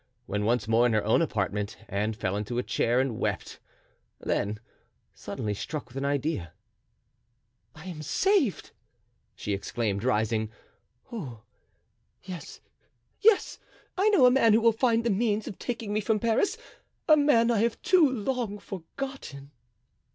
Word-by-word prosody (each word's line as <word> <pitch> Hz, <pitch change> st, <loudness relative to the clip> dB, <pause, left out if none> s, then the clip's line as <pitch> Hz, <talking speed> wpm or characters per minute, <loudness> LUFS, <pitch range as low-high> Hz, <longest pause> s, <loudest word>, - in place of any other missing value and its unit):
When 105 Hz, +1 st, -2 dB
once 115 Hz, -1 st, +1 dB
more 115 Hz, +2 st, +4 dB
in 120 Hz, -, 0 dB
her 110 Hz, -, +2 dB
own 110 Hz, -, +3 dB
apartment 105 Hz, -7 st, -2 dB
Anne 105 Hz, +3 st, -1 dB
fell 95 Hz, -2 st, -2 dB
into 105 Hz, +4 st, -3 dB
a 125 Hz, -, 0 dB
chair 120 Hz, 0 st, +1 dB
and 130 Hz, -4 st, -1 dB
wept; -, -, -3 dB, 0.6 s
then 105 Hz, +1 st, -1 dB, 0.5 s
suddenly 105 Hz, -1 st, -4 dB
struck 150 Hz, +9 st, -5 dB
with 125 Hz, -, -17 dB
an 135 Hz, +1 st, -2 dB
idea: 140 Hz, -, -1 dB, 1.2 s
"I 155 Hz, +2 st, -12 dB
am 170 Hz, -5 st, -6 dB
saved!" 335 Hz, -, +1 dB, 0.6 s
she 105 Hz, -, -3 dB
exclaimed, 100 Hz, 0 st, -2 dB
rising; 110 Hz, -2 st, +1 dB, 0.6 s
"oh, 130 Hz, -, -7 dB, 0.8 s
yes! 180 Hz, -2 st, -8 dB, 0.6 s
yes! 440 Hz, -1 st, +3 dB, 0.4 s
I 390 Hz, +3 st, +3 dB
know 355 Hz, -12 st, +5 dB
a 250 Hz, -, +7 dB
man 230 Hz, -4 st, +5 dB
who 225 Hz, -, +4 dB
will 230 Hz, 0 st, +5 dB
find 230 Hz, 0 st, +2 dB
the 235 Hz, -, +1 dB
means 210 Hz, +1 st, 0 dB
of 195 Hz, -, -7 dB
taking 225 Hz, -4 st, -4 dB
me 215 Hz, -, +1 dB
from 215 Hz, +1 st, +1 dB
Paris, 230 Hz, -, +1 dB, 0.5 s
a 310 Hz, -, +8 dB
man 265 Hz, -6 st, +4 dB
I 225 Hz, -, +2 dB
have 230 Hz, +1 st, +1 dB
too 350 Hz, -6 st, +5 dB
long 240 Hz, -3 st, -2 dB
forgotten." 190 Hz, -, -7 dB
165 Hz, 150 wpm, -28 LUFS, -, 1.2 s, a